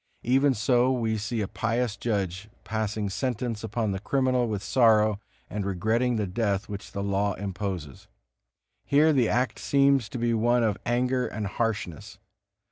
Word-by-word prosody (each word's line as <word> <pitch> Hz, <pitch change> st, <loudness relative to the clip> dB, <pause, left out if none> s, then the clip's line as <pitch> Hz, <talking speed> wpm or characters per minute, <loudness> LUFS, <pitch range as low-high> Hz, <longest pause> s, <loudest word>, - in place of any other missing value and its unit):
Even 135 Hz, +2 st, +3 dB
so 120 Hz, +3 st, +3 dB
we 115 Hz, -4 st, 0 dB
see 110 Hz, +2 st, -2 dB
a 100 Hz, -, -1 dB
pious 115 Hz, 0 st, -1 dB
judge 100 Hz, -2 st, -2 dB
passing 110 Hz, -1 st, -2 dB
sentence 115 Hz, +2 st, -3 dB
upon 110 Hz, -1 st, -1 dB
the 95 Hz, -, -3 dB
criminal 130 Hz, +2 st, +1 dB
with 105 Hz, -2 st, -3 dB
sorrow, 110 Hz, -4 st, +4 dB, 0.3 s
and 105 Hz, -1 st, -4 dB
regretting 110 Hz, +6 st, 0 dB
the 105 Hz, -2 st, 0 dB
death 100 Hz, +1 st, -1 dB
which 100 Hz, -1 st, -7 dB
the 100 Hz, -, -4 dB
law 100 Hz, 0 st, 0 dB
imposes. 95 Hz, -7 st, -5 dB, 0.8 s
Here 155 Hz, +2 st, +4 dB
the 125 Hz, -5 st, +3 dB
act 125 Hz, -2 st, 0 dB
seems 140 Hz, -4 st, +3 dB
to -, -, -5 dB
be 120 Hz, 0 st, +1 dB
one 120 Hz, +2 st, +2 dB
of 105 Hz, -2 st, 0 dB
anger 125 Hz, +1 st, +1 dB
and 105 Hz, 0 st, -4 dB
harshness. 100 Hz, -6 st, -3 dB
110 Hz, 155 wpm, -27 LUFS, 100-125 Hz, 0.8 s, sorrow